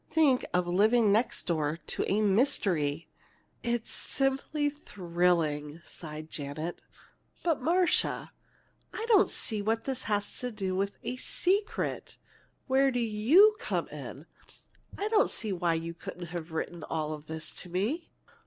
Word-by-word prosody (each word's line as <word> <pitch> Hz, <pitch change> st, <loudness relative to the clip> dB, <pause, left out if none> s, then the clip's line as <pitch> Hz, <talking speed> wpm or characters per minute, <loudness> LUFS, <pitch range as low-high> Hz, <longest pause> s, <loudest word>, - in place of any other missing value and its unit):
Think 290 Hz, -6 st, +4 dB
of 180 Hz, 0 st, +2 dB
living 210 Hz, +5 st, +4 dB
next 225 Hz, +4 st, +1 dB
door 155 Hz, -2 st, 0 dB
to -, -, -2 dB
a 210 Hz, +2 st, +3 dB
mystery!" 190 Hz, -, +1 dB, 0.5 s
"It's 235 Hz, -1 st, -2 dB
simply 275 Hz, +2 st, 0 dB
thrilling!" 170 Hz, -, 0 dB
sighed 155 Hz, -1 st, -8 dB
Janet. 155 Hz, +3 st, -5 dB, 0.6 s
"But, 330 Hz, -6 st, +1 dB
Marcia, 350 Hz, +5 st, +2 dB, 0.6 s
I 440 Hz, -, -3 dB
still 460 Hz, -1 st, +4 dB
don't 400 Hz, -, +5 dB
see 215 Hz, -3 st, -1 dB
what 225 Hz, +2 st, 0 dB
this 265 Hz, -1 st, -2 dB
has 205 Hz, -1 st, -1 dB
to 250 Hz, -, -2 dB
do 195 Hz, -4 st, -2 dB
with 195 Hz, +1 st, 0 dB
a 250 Hz, -, -3 dB
secret. 390 Hz, +9 st, -1 dB, 0.5 s
Where 270 Hz, +1 st, +4 dB
do 250 Hz, -2 st, -1 dB
you 240 Hz, -, +5 dB
come -, -, -1 dB
in? -, -, -8 dB, 0.7 s
I 410 Hz, -, -1 dB
don't 435 Hz, -1 st, +4 dB
see 215 Hz, -3 st, -1 dB
why 175 Hz, -2 st, +1 dB
you 165 Hz, +1 st, -4 dB
couldn't 170 Hz, 0 st, -8 dB
have 170 Hz, -1 st, -5 dB
written 165 Hz, +1 st, -4 dB
all 155 Hz, -1 st, -2 dB
this 155 Hz, +1 st, -6 dB
to 180 Hz, -, -8 dB
me." 220 Hz, -, -1 dB
205 Hz, 145 wpm, -30 LUFS, 170-270 Hz, 0.7 s, don't